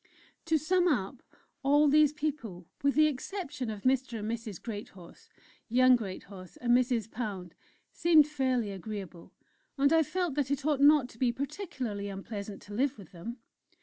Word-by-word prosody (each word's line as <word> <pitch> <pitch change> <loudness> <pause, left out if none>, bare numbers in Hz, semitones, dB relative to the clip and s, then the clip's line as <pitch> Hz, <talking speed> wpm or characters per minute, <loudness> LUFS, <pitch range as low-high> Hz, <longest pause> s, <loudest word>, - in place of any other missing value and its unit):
To 320 -1 +3
sum 355 +4 +2
up, 240 - -1 0.4
all 290 +2 +4
these 300 0 +5
people, 285 - -4 0.2
with 280 0 +2
the 310 +1 +6
exception 290 - -3
of 210 -2 -6
Mr. 260 -2 +1
and 215 +1 -3
Mrs. 225 -5 -5
Greathorse, 205 -6 -9 0.4
young 255 +2 +6
Greathorse, 190 -4 -7
and 240 -1 +3
Mrs. 245 -3 +1
Pound, 195 -7 -5 0.4
seemed 320 -3 +5
fairly 260 -7 -1
agreeable, 195 -3 -7 0.5
and 280 +2 +4
I 325 - +6
felt 350 +1 -1
that 280 -2 -1
it 280 -1 -2
ought 295 -3 +1
not 290 -2 +6
to 230 - -17
be 250 -2 +3
particularly 250 - -4
unpleasant 200 +1 -7
to 205 - -11
live 270 +5 0
with 195 -6 -13
them. 220 +8 -7
250 Hz, 160 wpm, -30 LUFS, 205-290 Hz, 0.5 s, the